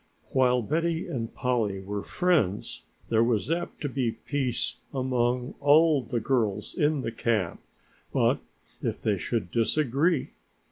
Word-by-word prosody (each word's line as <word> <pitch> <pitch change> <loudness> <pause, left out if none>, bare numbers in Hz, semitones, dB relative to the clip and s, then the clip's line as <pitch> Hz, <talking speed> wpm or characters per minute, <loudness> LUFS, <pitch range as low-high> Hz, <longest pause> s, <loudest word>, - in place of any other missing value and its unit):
While 125 -2 +3
Betty 165 +6 0
and 115 -3 -3
Polly 115 -6 0
were 100 +1 -4
friends 160 - 0 0.2
there 115 0 +4
was 115 +4 +1
apt 170 +1 -2
to 145 - -1
be 130 -3 0
peace 135 -5 -2
among 125 -1 0
all 150 +1 +5
the 120 -1 -2
girls 110 -4 0
in 150 -2 +1
camp, 110 -6 -1 0.5
but - - +2 0.4
if - - -2
they 105 -3 0
should 90 +1 -2
disagree? 140 +6 +1
125 Hz, 130 wpm, -27 LUFS, 110-145 Hz, 0.5 s, all